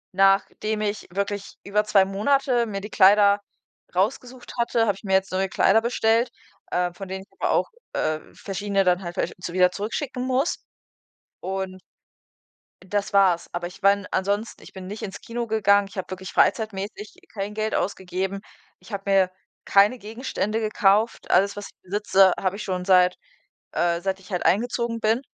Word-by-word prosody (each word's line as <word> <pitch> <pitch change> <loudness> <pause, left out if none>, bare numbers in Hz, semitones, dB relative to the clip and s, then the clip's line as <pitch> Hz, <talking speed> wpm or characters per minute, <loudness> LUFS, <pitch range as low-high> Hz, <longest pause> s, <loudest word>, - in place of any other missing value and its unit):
nachdem 195 +2 +2
ich 210 0 -3
wirklich 200 +1 -3
über 210 +1 +1
2 200 -2 +4
Monate 240 +5 +1
mir 200 -2 -4
die 210 - -7
Kleider 200 +1 +6 0.6
rausgesucht 245 +6 -2
hatte, 235 -1 +2
habe 205 - +3
ich 195 - -16
mir 190 -2 -2
jetzt 190 0 +2
neue 190 +1 0
Kleider 200 +3 +4
bestellt 230 0 +2 0.4
äh, 180 0 0
von 195 +2 -8
denen 190 +1 -5
ich - - -27
aber - - +1
auch, - - +1 0.2
äh, 155 0 0
verschiedene 200 0 -1
dann 180 0 +2
halt 175 0 -6
versch - - -2
zu 175 - -5
wieder 180 0 +4
zurückschicken 250 +7 -4
muss. 260 +5 0 0.8
Und 190 -1 -4 1.0
das 205 +2 -2
war's. 190 -4 +3
Aber 175 0 -3
ich 185 +3 -14
meine 200 0 +2
ansonsten, 200 +4 -1
ich - - -14
bin 190 -1 -8
nicht 210 +3 -7
ins 200 0 -6
Kino 235 0 -4
gegangen, 205 -2 +3
ich 195 - -14
habe 190 - -4
wirklich 190 0 -7
freizeitmäßig 210 -1 0 0.2
kein 200 0 -4
Geld 215 +1 -2
ausgegeben. 190 +1 -2 0.4
Ich - - -16
habe 195 -1 -4
mir 190 -2 +4 0.3
keine 205 +5 +4
Gegenstände 220 -1 -3
gekauft. 215 0 +1
Alles, 200 +1 +3
was 205 0 -6
ich - - -22
besitze, 195 -1 +3
habe 190 +1 -1
ich 215 - -6
schon 185 -2 -3
seit 180 -1 +5 0.6
äh, 170 0 +1
seit 190 +1 -2
ich 190 +1 -16
halt 180 - -2
eingezogen 235 +2 +1
bin. 225 +2 +1
200 Hz, 175 wpm, -24 LUFS, 190-215 Hz, 1.0 s, Kleider